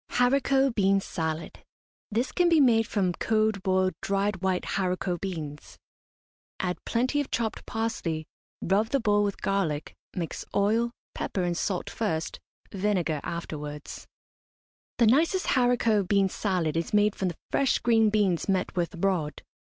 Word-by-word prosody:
HARICOT 270 +1 +3
BEAN 195 -2 +3
SALAD. 160 -3 -4 0.5
This 235 +5 -1
can 355 -1 +3
be 330 -2 +5
made 225 -5 +4
from 185 -4 0
cold, 215 0 +1
boiled, 185 0 +2
dried 195 -1 0
white 190 -1 0
haricot 180 -2 -1
beans. 150 - -6 0.8
Add 180 -1 -2
plenty 255 +5 +1
of 285 - -6
chopped 225 -2 -2
parsley, 225 -9 -2 0.4
rub 200 +4 +2
the 275 +4 +1
bowl 205 -3 +2
with 200 -1 -2
garlic, 170 -7 -1 0.2
mix 170 -3 -4
oil, 220 +4 +2 0.2
pepper 185 - -2
and 175 -1 0
salt 180 +1 -2
first, 165 -8 -2 0.3
vinegar 185 -6 0
afterwards. 150 -3 -6 0.9
The 235 - +5
nicest 320 - +3
haricot 240 -6 +2
bean 195 -1 +3
salad 180 -6 -1
is 165 +5 -1
made 210 0 +3
from 190 - -1
the 170 - -4
fresh 275 -2 +2
green 225 -2 +3
beans 200 -4 +1
met 190 0 0
with 175 +1 -1
abroad. 170 -5 -1
195 Hz, 145 wpm, -27 LUFS, 175-225 Hz, 0.9 s, be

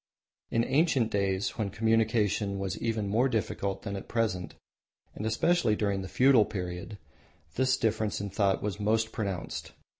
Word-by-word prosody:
In 115 - +1
ancient 135 -5 +2
days, 100 -1 -1
when 105 -2 0
communication 110 -2 +1
was 95 0 -2
even 110 -3 -1
more 115 +7 +2
difficult 100 -4 -2
than 100 -2 -4
at 95 - -7
present, 110 -6 -1 0.6
and 110 - -4
especially 140 +1 +2
during 100 -2 0
the 95 - -6
feudal 130 -3 +5
period, 90 +1 -5 0.6
this 130 0 +2
difference 110 -2 0
in 100 -1 -4
thought 100 -1 +1
was 105 -1 -3
most 110 +2 +1
pronounced. 100 -6 -4
105 Hz, 150 wpm, -29 LUFS, 100-115 Hz, 0.6 s, feudal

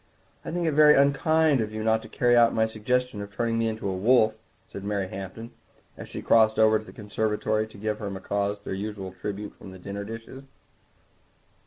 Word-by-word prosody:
"I - - -6
think 175 0 -2
it 160 - +2
very 150 0 +6
unkind 140 +1 +3
of 110 -1 -3
you 110 0 -4
not 110 0 +2
to - - -12
carry 120 0 +2
out 120 -1 +5
my 110 - +3
suggestion 110 +1 -1
of 100 0 -8
turning 115 +2 -1
me 115 - +1
into 110 -2 -3
a 95 - -2
wolf," 110 +2 +4 0.3
said 100 - -9
Mary 100 -2 -2
Hampton, 95 +5 -8 0.4
as - - -10
she - - -7
crossed 110 -1 +4
over 110 0 +5
to 110 - -12
the - - -11
conservatory 110 0 -1
to 110 - -15
give 105 +1 -3
her 105 -3 -4
macaws 100 +1 -2
their - - -5
usual 100 -1 -5
tribute 100 +3 -6
from - - -12
the 95 - -11
dessert 100 +2 -6
dishes. 115 +5 -9
110 Hz, 205 wpm, -26 LUFS, 100-115 Hz, 0.4 s, very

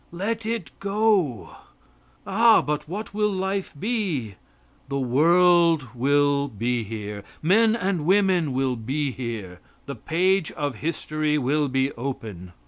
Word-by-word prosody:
Let 215 +5 -3
it 225 -9 -3
go. 200 - 0 0.7
Ah! 225 +3 +5
but 150 0 -3
what 205 +3 -6
will 210 0 +1
life 190 -1 -3
be? 190 - -2 0.6
The 140 - -2
world 165 +2 +3
will 140 +2 +2
be 120 +1 -2
here. 105 -1 -6 0.2
Men 220 +6 +4
and 185 -8 -2
women 185 -5 +3
will 130 -1 0
be 135 +5 -2
here. 110 -8 -6 0.3
The 140 - -5
page 180 +3 0
of 145 -3 -3
history 155 -1 -1
will 145 +2 +1
be 135 +1 0
open. 110 -8 -7
150 Hz, 130 wpm, -24 LUFS, 130-190 Hz, 0.7 s, Ah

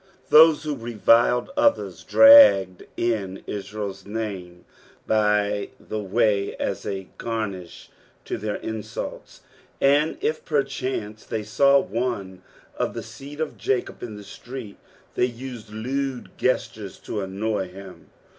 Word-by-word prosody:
Those 155 0 +7
who 150 -1 -2
reviled 120 - +2
others 290 -1 +1
draped 275 - +7 0.2
in 105 -5 -2
Israel's 100 0 -5
name 100 -5 -6 0.4
by 105 -1 +1
the 110 - -5
way 100 0 +1
as - - -3
a 95 -1 -4
garnish 100 -7 -5 0.3
to - - -4
their 105 0 -3
insults, 110 -2 -6 0.4
and 145 +3 +3
if 155 0 -2
perchance 130 -7 -2
they 110 - -4
saw 140 +6 +4
one 100 -7 -3 0.3
of - - -2
the - - -5
seed 145 +2 -11
of 160 -1 -4
Jacob 130 -2 -2
in 115 -3 -6
the 105 - -10
street 115 +1 -9 0.4
they - - +2
used 120 -2 -8
lewd 130 +4 -4
gestures 110 -6 -2
to 105 - -4
annoy 100 +1 -2
him. 95 0 -12
110 Hz, 125 wpm, -24 LUFS, 100-135 Hz, 0.4 s, Those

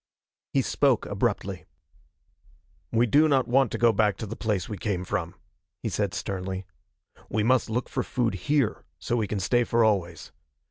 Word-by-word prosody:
He - - +2
spoke - - +2
abruptly. - - -2 1.3
"We 115 +2 +3
do 145 +7 +4
not 135 -4 +2
want 130 0 +3
to - - -2
go 115 -1 +4
back 105 -3 +2
to - - -5
the 110 +2 -6
place 105 -6 -1
we 105 -4 -6
came 95 -3 -2
from," 90 -3 -3 0.5
he 115 - -1
said 100 -1 -1
sternly. 95 0 -4 0.6
"We 110 - 0
must 125 +1 +2
look 120 +3 -1
for - - -2
food 120 -4 -1
here, 135 +6 0
so 80 - -2
we 110 -3 0
can 105 - -2
stay 120 +5 +2
for 115 0 +2
always. 90 -6 0
110 Hz, 175 wpm, -26 LUFS, 95-120 Hz, 1.3 s, do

